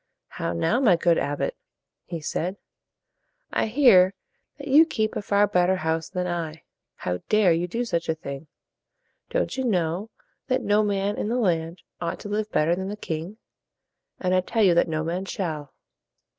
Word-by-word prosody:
"How - - -3
now, 85 - +1
my 220 -10 +5
good 170 0 +2
abbot?" 145 - -2 0.5
he 170 -3 -6
said. 180 +5 -3 0.9
"I - - +1
hear 215 -7 +5 0.4
that 285 0 -8
you 290 +4 +7
keep 220 -9 -1
a - - -2
far 200 0 +3
better 180 -2 +2
house 160 -2 -2
than 180 -1 -2
I. 165 -3 -4 0.3
How 90 0 -3
dare 210 -5 +5
you 170 +2 -1
do 235 +7 -2
such 170 -7 -2
a 160 - +2
thing? 140 -1 -7 0.8
Don't - - -1
you 265 - 0
know 185 -2 0 0.4
that 255 0 0
no 205 +1 +3
man 200 -1 0
in 210 - -2
the 240 - 0
land 170 -6 0 0.2
ought 170 -1 -3
to 205 - -7
live 210 +1 -1
better 165 +3 +2
than 190 +1 -4
the 210 - -5
king? 170 +2 -5 0.8
And 185 -1 0
I 185 - +4
tell 220 +4 0
you 185 -3 +6
that 170 - +3
no 155 0 -1
man 175 +4 -2
shall." 155 -7 -4
185 Hz, 180 wpm, -25 LUFS, 165-215 Hz, 0.9 s, you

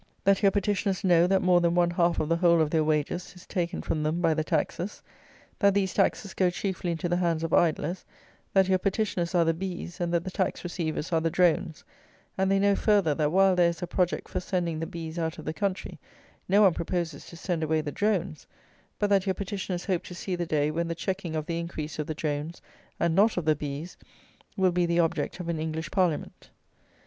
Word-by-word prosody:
"That 195 0 +3
your 200 - +6
petitioners 200 -1 0
know 175 -2 +5
that 190 0 +2
more 180 -1 +4
than 170 0 +2
one 175 -1 +3
half 175 -1 +2
of 155 - 0
the 165 +1 +2
whole 170 -1 +4
of 155 -2 +1
their 160 -2 +2
wages 155 +4 -1
is 180 - -14
taken 175 -3 -3
from 155 - -1
them 155 +3 0
by 165 -2 +3
the 155 0 -1
taxes; 170 +4 -2 0.6
that 200 -1 +4
these 195 -2 +1
taxes 195 0 0
go 185 -2 +2
chiefly 180 0 -3
into 165 +1 -3
the 175 0 +1
hands 170 -2 0
of 165 - -2
idlers; 170 +1 +1 0.5
that 190 -1 +4
your 190 -1 +3
petitioners 190 -3 -1
are 170 -1 +4
the 165 - +2
bees, 175 0 -6
and 170 -1 0
that 170 -1 +1
the 185 - -5
tax 185 0 -2
receivers 170 -2 -3
are 165 - +3
the 165 - +1
drones; 175 -1 +1 0.5
and 190 0 +1
they 195 - +3
know, 200 0 +3
further, 200 -9 +3
that 150 0 0
while 190 +1 +4
there 175 -1 +4
is 170 +2 -5
a - - 0
project 180 0 -1
for - - -3
sending 175 -3 -2
the 165 - -3
bees 165 0 -6
out 160 -1 -2
of 155 - -9
the 155 - -2
country, 195 0 -3 0.5
no 205 +3 +5
one 190 -4 +6
proposes 170 -3 -3
to 170 - -11
send 175 -2 -2
away 160 0 +1
the 150 -1 -3
drones; 190 -6 -1 0.5
but 205 - +1
that 195 -1 +3
your 190 - +1
petitioners 190 -2 -4
hope 185 -4 0
to 180 - -10
see 185 +1 -3
the 175 -1 -3
day 150 -1 +1
when 170 +2 -1
the 170 - -3
checking 180 -1 -3
of 155 -1 -2
the 170 0 -2
increase 160 -2 -5
of 150 - -2
the 155 - -3
drones, 150 +2 -3 0.4
and 170 -1 +2
not 205 +5 +3
of 175 - -1
the 155 -1 +4
bees, 145 +4 -6 0.6
will 190 -1 +3
be 175 0 +1
the 170 0 +1
object 165 +2 0
of 180 - -5
an 170 -2 -2
English 160 +1 -4
Parliament. 180 -6 -1
175 Hz, 230 wpm, -27 LUFS, 160-190 Hz, 0.6 s, your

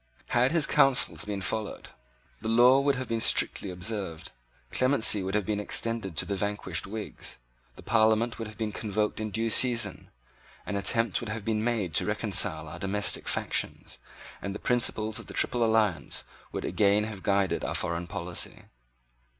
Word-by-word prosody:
Had 125 +3 +3
his 165 -3 +4
advice 135 -2 +3
been 100 -2 -4
followed, 110 +1 -3 0.5
the 110 - -5
laws 125 +4 +5
would 140 -1 +3
have 130 -1 -4
been 115 -1 -1
strictly 100 - +2
observed: 90 -2 -5 0.4
clemency 130 -5 +4
would 95 +2 -3
have 105 -2 +1
been 105 0 -1
extended 105 -4 -1
to - - +1
the 100 - -2
vanquished 100 -3 -2
Whigs: 105 +1 -6 0.4
the - - -13
Parliament 110 +1 +2
would 115 - -4
have 105 - -12
been 110 -2 -2
convoked 105 0 -2
in 110 0 -3
due 115 +2 -1
season: 120 0 +2 0.6
an 100 - -4
attempt 110 +1 +1
would 120 - -6
have 110 -2 -5
been 110 -1 0
made 110 -8 -1
to - - +1
reconcile 80 0 +1
our 85 +3 -9
domestic 100 +1 0
factions; - - -2 0.4
and 100 0 -4
the - - -5
principles 110 -3 +1
of - - -10
the - - -9
Triple 120 -1 +1
Alliance 105 -10 +2 0.3
would - - -4
again 105 0 +2
have 105 -3 -6
guided 100 -2 +1
our - - -2
foreign 85 +1 -2
policy. 85 0 -5
105 Hz, 170 wpm, -28 LUFS, 100-115 Hz, 0.6 s, laws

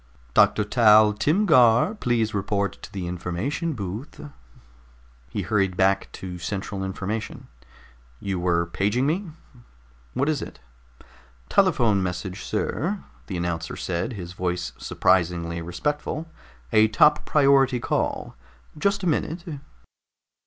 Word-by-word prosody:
"Doctor 105 - +4
Dal 105 -1 +5
Timgar, 145 - +4
please 115 -3 0
report 100 0 -1
to - - -10
the 95 -3 -5
information 90 - -3
booth." 105 - -6 1.1
He - - -3
hurried 95 -4 0
back 95 0 +2
to 90 -2 -7
central 95 +1 -4
information. 100 +3 -5 0.7
"You 95 -2 -3
were 85 -1 +1
paging 105 +9 0
me. 175 +5 -1 0.9
What 140 - +1
is 155 -3 0
it?" - - -8 0.9
"Telephone 105 -5 +3
message, 90 +1 -4
sir," 190 +7 -2 0.2
the 95 - -4
announcer 85 -1 -3
said, 90 +7 -3
his 90 -4 -7
voice 90 -9 -3
surprisingly 85 -2 +1
respectful. 150 - -3 0.5
"A 110 0 +6
top 150 +7 +4
priority 135 -3 +4
call. - - -2 0.4
Just 200 +5 0
a - - 0
minute." 165 +1 -1
105 Hz, 115 wpm, -24 LUFS, 90-135 Hz, 1.1 s, A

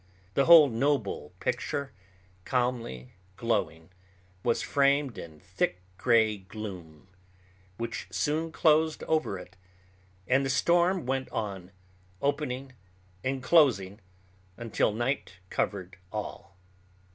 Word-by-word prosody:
The 135 - +3
whole 165 -3 +9
noble 135 +4 -1
picture, 140 -3 -2 0.5
calmly 120 - -2 0.2
glowing, 100 -7 -1 0.5
was 120 +2 +1
framed 140 -2 +2
in 80 -2 -10
thick 90 -1 -2 0.2
gray 110 -3 +3
gloom, 95 -5 -9 0.7
which 115 -2 -4
soon 160 +2 -1
closed 160 0 +3
over 155 -11 0
it; 90 +1 -12 0.7
and 130 +2 +3
the 135 - -1
storm 170 +5 +2
went 130 +1 -1
on, 95 -4 -4 0.5
opening 135 -2 -2 0.5
and 130 0 -2
closing 115 - +4 0.6
until 115 -2 0
night 120 0 -2 0.2
covered 95 -1 -2
all. 100 -3 -6
120 Hz, 100 wpm, -29 LUFS, 95-140 Hz, 0.7 s, whole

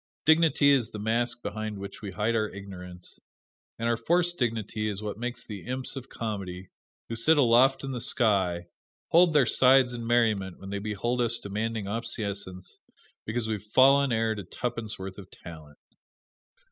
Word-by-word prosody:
Dignity 160 -2 +5
is 130 -5 +2
the - - -8
mask 120 +3 -1
behind 110 -1 -4
which 100 0 -8
we 105 - -5
hide 105 +5 -1
our 110 -1 0
ignorance; 90 -2 -10 0.6
and 115 - -2
our 115 - +2
forced 175 +8 +1
dignity 110 -3 -1
is 105 0 -5
what 105 0 -5
makes 120 0 -5
the 105 -4 -7
imps 130 +2 -3
of 135 -1 -8
comedy, 95 -5 -5 0.4
who 115 - -4
sit 150 +8 +4
aloft 130 +1 +4
in 135 - -4
the 125 -2 -3
sky, 95 -8 +1 0.4
hold 170 0 +5
their 145 -4 +5
sides 130 +1 +4
in 115 -1 -5
merriment 110 -6 +1
when 95 0 -9
they 100 - -2
behold 110 +4 -2
us 120 0 +2
demanding 110 +1 -3
obeisance 100 -4 -4 0.5
because 115 +1 -2
we 110 - -1
have 105 -2 -5
fallen 135 +5 +4
heir 115 -1 +1
to 105 -2 -6
tuppence 115 +3 -5
worth 95 +1 -7
of 95 -1 -12
talent. 80 -3 -12
110 Hz, 170 wpm, -27 LUFS, 100-125 Hz, 0.6 s, Dignity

